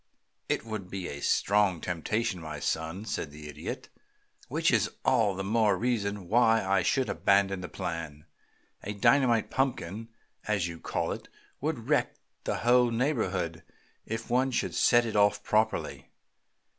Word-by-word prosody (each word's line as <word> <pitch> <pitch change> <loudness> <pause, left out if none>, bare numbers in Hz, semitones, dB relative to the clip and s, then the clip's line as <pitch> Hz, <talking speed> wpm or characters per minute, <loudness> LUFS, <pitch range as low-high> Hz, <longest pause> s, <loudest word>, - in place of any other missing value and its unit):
"It - - 0
would 110 -5 -5
be 95 -2 -4
a 70 - -7
strong 100 -1 +2
temptation, 90 +4 -2
my 75 -2 -6
son," 80 +6 -2
said 80 - -3
the 75 +1 -10
Idiot, 75 - -6 0.6
"which - - +1
is - - +2 0.2
all 110 -6 +3
the 95 - -3
more 110 +1 +2
reason 105 -6 -1
why 115 0 +4
I 95 0 +3
should 130 +7 +1
abandon 100 -2 +2
the 90 - -6
plan. 80 -3 -5 0.6
A 105 - -4
dynamite 120 +2 +3
punkin, 115 -5 -1 0.4
as 100 -5 +1
you 85 -1 -7
call - - -2
it, - - -7 0.3
would - - -3
wreck - - +1 0.3
the - - 0
whole 125 0 +5
neighborhood 105 - -1 0.5
if 115 +1 -4
one 130 +2 +2
should 125 - -1
set 120 -1 +4
it 110 - -4
off 105 0 +3
properly. 110 +1 0
100 Hz, 150 wpm, -29 LUFS, 90-115 Hz, 0.6 s, whole